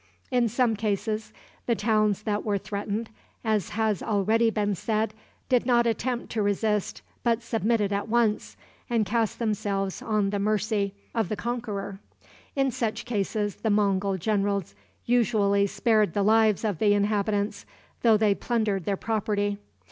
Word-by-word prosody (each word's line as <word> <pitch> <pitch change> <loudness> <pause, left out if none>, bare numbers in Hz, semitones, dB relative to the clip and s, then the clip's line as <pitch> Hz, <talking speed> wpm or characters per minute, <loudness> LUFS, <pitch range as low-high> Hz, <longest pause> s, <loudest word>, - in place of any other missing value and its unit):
In 245 -2 +2
some 240 0 +2
cases, 215 +1 -2 0.4
the 235 - +3
towns 215 -2 +1
that 210 -1 -1
were 205 -2 0
threatened, 205 +3 -4 0.3
as 215 -4 0
has 215 -2 0
already 220 +2 +2
been 205 -2 0
said, 215 +3 -1 0.3
did 250 -2 +3
not 240 -1 +3
attempt 235 +2 -1
to 220 - -1
resist, 205 0 0 0.2
but 235 -1 +1
submitted 225 -2 0
at 200 +2 -2
once, 230 -2 +1 0.3
and 230 -3 +2
cast 225 +1 0
themselves 200 -4 -1
on 210 -3 0
the 205 - -1
mercy 205 -1 0 0.2
of 225 -6 0
the 215 - -1
conqueror. 205 -3 -4 0.6
In 270 -1 +2
such 225 -2 -2
cases 205 -2 -1
the 220 - -1
Mongul 200 -2 +2
generals 200 - 0 0.3
usually 210 -4 +3
spared 215 -4 +2
the 200 - +1
lives 220 0 +3
of 205 -6 -1
the 205 -1 +4
inhabitants, 205 0 0 0.3
though 225 -2 +5
they 210 -1 +3
plundered 210 -5 -1
their 200 -1 0
property. 205 -2 -1
215 Hz, 150 wpm, -26 LUFS, 200-225 Hz, 0.6 s, though